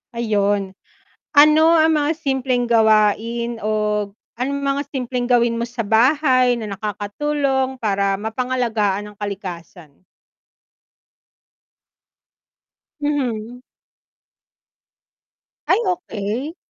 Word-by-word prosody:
Ayun. 205 Hz, -4 st, 0 dB, 0.6 s
Ano 305 Hz, +2 st, +6 dB
ang 320 Hz, -1 st, +4 dB
mga 295 Hz, +1 st, +1 dB
simpleng 265 Hz, -5 st, -1 dB
gawain 225 Hz, +1 st, +2 dB
o 215 Hz, -, 0 dB, 0.6 s
anong 275 Hz, +4 st, -2 dB
mga 275 Hz, 0 st, 0 dB
simpleng 250 Hz, -2 st, -3 dB
gawin 235 Hz, -1 st, +3 dB
mo 230 Hz, -, -2 dB
sa 235 Hz, -1 st, -4 dB
bahay 255 Hz, +1 st, +3 dB
na 210 Hz, -3 st, -5 dB
nakakatulong 265 Hz, +7 st, -2 dB
para 200 Hz, -2 st, 0 dB
mapangalagaan 220 Hz, -3 st, -2 dB
ang -, -, -27 dB
kalikasan? 180 Hz, -6 st, -8 dB, 3.0 s
Mhm. 250 Hz, -5 st, -2 dB, 2.0 s
Ay, 380 Hz, -, +3 dB
okey. 280 Hz, -, -3 dB
235 Hz, 85 wpm, -20 LUFS, 210-275 Hz, 3.0 s, Ano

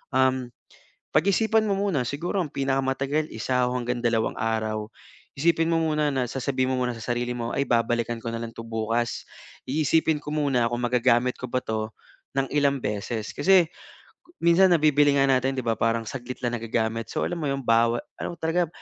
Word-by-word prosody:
um, 130 Hz, -1 st, +2 dB, 0.7 s
pag-isipan 215 Hz, +6 st, +3 dB
mo 205 Hz, -, +1 dB
muna. 195 Hz, -10 st, 0 dB
Siguro 170 Hz, -, -2 dB
ang 150 Hz, -, -6 dB
pinakamatagal, 135 Hz, +2 st, 0 dB
isa 125 Hz, +3 st, 0 dB
hanggang 125 Hz, -1 st, -2 dB
dalawang 115 Hz, -1 st, +1 dB
araw. 110 Hz, -1 st, -1 dB, 0.5 s
Isipin 165 Hz, +2 st, +2 dB
mo 165 Hz, -, +3 dB
muna, 150 Hz, -2 st, +1 dB, 0.2 s
sasabihin 130 Hz, 0 st, -1 dB
mo -, -, +1 dB
muna 125 Hz, -1 st, -1 dB
sa -, -, -10 dB
sarili 120 Hz, 0 st, -2 dB
mo, 120 Hz, -1 st, -3 dB
Ay, 140 Hz, -, +1 dB
babalikan 115 Hz, -1 st, 0 dB
ko 115 Hz, -, -4 dB
na 115 Hz, -, -2 dB
lang 115 Hz, -1 st, -6 dB
'to 115 Hz, -, -8 dB
bukas. 115 Hz, +1 st, -2 dB, 0.4 s
isipin 155 Hz, +2 st, +2 dB
ko 150 Hz, -, -7 dB
muna 140 Hz, -6 st, +2 dB
kung 120 Hz, +1 st, -3 dB
magagamit 125 Hz, 0 st, +2 dB
ko 125 Hz, -, -6 dB
ba 130 Hz, +1 st, -1 dB
'to 110 Hz, -2 st, -3 dB, 0.5 s
ng 135 Hz, -, +2 dB
ilang 140 Hz, -1 st, +3 dB
beses. 105 Hz, 0 st, -3 dB
Kasi 190 Hz, -3 st, +5 dB, 0.8 s
minsan 170 Hz, +3 st, +6 dB
nabibili 145 Hz, -3 st, +4 dB
nga 140 Hz, 0 st, +4 dB
natin, 130 Hz, +1 st, +1 dB
'di 130 Hz, -, -1 dB
ba, 115 Hz, -1 st, +1 dB
parang 115 Hz, 0 st, +1 dB
saglit 125 Hz, 0 st, -6 dB
lang 120 Hz, 0 st, 0 dB
nagagamit. 115 Hz, 0 st, -2 dB
So -, -, -1 dB
alam 175 Hz, -, -4 dB
mo 150 Hz, -, -2 dB
'yung 135 Hz, 0 st, -2 dB
bawat 115 Hz, 0 st, +3 dB, 0.2 s
ano 175 Hz, -, -4 dB
talaga, 170 Hz, +2 st, +1 dB
130 Hz, 180 wpm, -25 LUFS, 115-150 Hz, 0.8 s, minsan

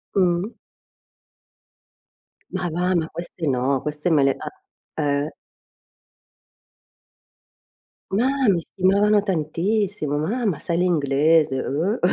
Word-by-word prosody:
Mh-mh. 185 Hz, +2 st, +1 dB, 2.0 s
Ma 175 Hz, -, -2 dB
va, 180 Hz, +3 st, 0 dB
ma 160 Hz, -2 st, 0 dB
queste 170 Hz, -1 st, -6 dB
no, 130 Hz, 0 st, +1 dB
queste 150 Hz, +3 st, -2 dB
me 150 Hz, -4 st, +4 dB
le 135 Hz, -1 st, +3 dB
ah, -, -, -6 dB, 0.5 s
eh. 145 Hz, +1 st, 0 dB, 2.8 s
Ma 225 Hz, +7 st, +2 dB, 0.2 s
mi 175 Hz, -3 st, +3 dB
stimavano 200 Hz, +4 st, +2 dB
tantissimo. 180 Hz, -1 st, -1 dB
"Ma 220 Hz, +11 st, -1 dB
ma 170 Hz, -7 st, 0 dB
sai 170 Hz, -1 st, -2 dB
l'inglese?" 150 Hz, -4 st, +2 dB
Oh! 170 Hz, -, -1 dB
170 Hz, 100 wpm, -22 LUFS, 150-195 Hz, 2.8 s, me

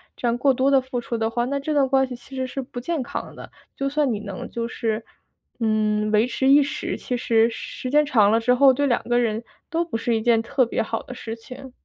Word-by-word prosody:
这 -, -, -6 dB
样 235 Hz, 0 st, +1 dB
过 270 Hz, +1 st, +3 dB
多 260 Hz, +2 st, +2 dB
地 275 Hz, -, +6 dB
付 250 Hz, -1 st, -4 dB
出 235 Hz, 0 st, -3 dB
的 225 Hz, 0 st, 0 dB
话， 240 Hz, +1 st, -1 dB
那 280 Hz, +2 st, -2 dB
这 300 Hz, +3 st, -2 dB
段 280 Hz, -3 st, +3 dB
关 265 Hz, 0 st, +3 dB
系 250 Hz, -, -6 dB
其 245 Hz, +3 st, -15 dB
实 260 Hz, -, -1 dB
是 270 Hz, +1 st, -4 dB
不 250 Hz, -1 st, -8 dB
健 300 Hz, +2 st, -2 dB
康 -, -, -6 dB
的。 -, -, -11 dB, 0.2 s
就 275 Hz, 0 st, -1 dB
算 290 Hz, -2 st, +1 dB
你 215 Hz, -, -2 dB
能 200 Hz, -3 st, -7 dB
就 230 Hz, 0 st, -3 dB
是， 225 Hz, -2 st, -3 dB, 0.5 s
嗯， 215 Hz, -1 st, +1 dB
维 215 Hz, +1 st, +4 dB
持 265 Hz, +1 st, -1 dB
一 285 Hz, +2 st, +7 dB
时， 280 Hz, -, -4 dB
其 250 Hz, -, -3 dB
实 230 Hz, -1 st, +3 dB
时 255 Hz, +2 st, -6 dB
间 300 Hz, +1 st, +4 dB
长 215 Hz, -8 st, +4 dB
了 225 Hz, -, +4 dB
之 240 Hz, +2 st, +3 dB
后， 270 Hz, +1 st, +6 dB
对 285 Hz, +3 st, 0 dB
两 240 Hz, -, +1 dB
个 240 Hz, 0 st, +1 dB
人 225 Hz, -2 st, 0 dB, 0.3 s
都 335 Hz, 0 st, 0 dB
不 330 Hz, -, -6 dB
是 235 Hz, +1 st, -1 dB
一 220 Hz, -, 0 dB
件 230 Hz, 0 st, +3 dB
特 255 Hz, +2 st, +1 dB
别 235 Hz, -, -1 dB
好 225 Hz, +1 st, -3 dB
的 250 Hz, -, -9 dB
事 230 Hz, -2 st, -6 dB
情。 260 Hz, +3 st, -11 dB
245 Hz, 280 characters per minute, -23 LUFS, 225-270 Hz, 0.5 s, 一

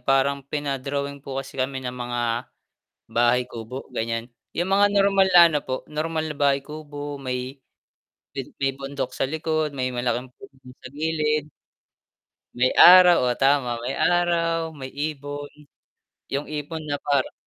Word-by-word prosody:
parang 135 Hz, +2 st, +2 dB
pina-drawing 140 Hz, -1 st, -3 dB
po 135 Hz, -1 st, -7 dB
kasi 135 Hz, -1 st, -5 dB
kami 130 Hz, 0 st, -2 dB
ng 125 Hz, -, -3 dB
mga, 120 Hz, -1 st, -4 dB, 0.9 s
bahay 120 Hz, +2 st, +2 dB
kubo, 120 Hz, +3 st, -7 dB
ganyan. 115 Hz, 0 st, -2 dB, 0.3 s
Yung 175 Hz, +2 st, 0 dB
mga 200 Hz, +1 st, +5 dB
normal 195 Hz, -1 st, +4 dB
na 175 Hz, -, +9 dB
ano 150 Hz, -2 st, 0 dB
po, 130 Hz, 0 st, -3 dB
normal 155 Hz, +1 st, -2 dB
na 150 Hz, -, -5 dB
bahay 140 Hz, -1 st, +2 dB
kubo, 145 Hz, -1 st, -7 dB
may 130 Hz, +1 st, -4 dB, 1.0 s
may 135 Hz, 0 st, +1 dB
bundok 140 Hz, 0 st, -5 dB
sa -, -, -1 dB
likod, 155 Hz, 0 st, -1 dB
may 130 Hz, -1 st, -1 dB
malaking 120 Hz, +1 st, -2 dB
puno 200 Hz, -, -14 dB
dun 125 Hz, 0 st, -13 dB
sa -, -, -7 dB
gilid 150 Hz, 0 st, -1 dB, 1.1 s
may 130 Hz, +1 st, +4 dB, 0.2 s
araw 180 Hz, -1 st, +8 dB
oo 125 Hz, -, +1 dB
tama 135 Hz, -3 st, +3 dB
may 130 Hz, +3 st, -3 dB, 0.2 s
araw, 165 Hz, -2 st, +1 dB
may 130 Hz, -, -6 dB, 0.2 s
ibon, 145 Hz, -1 st, -6 dB, 0.8 s
yung 140 Hz, +2 st, -3 dB
ibon 155 Hz, +2 st, -5 dB
na 145 Hz, -1 st, -3 dB
parang 140 Hz, -2 st, 0 dB
140 Hz, 150 wpm, -24 LUFS, 130-155 Hz, 1.1 s, na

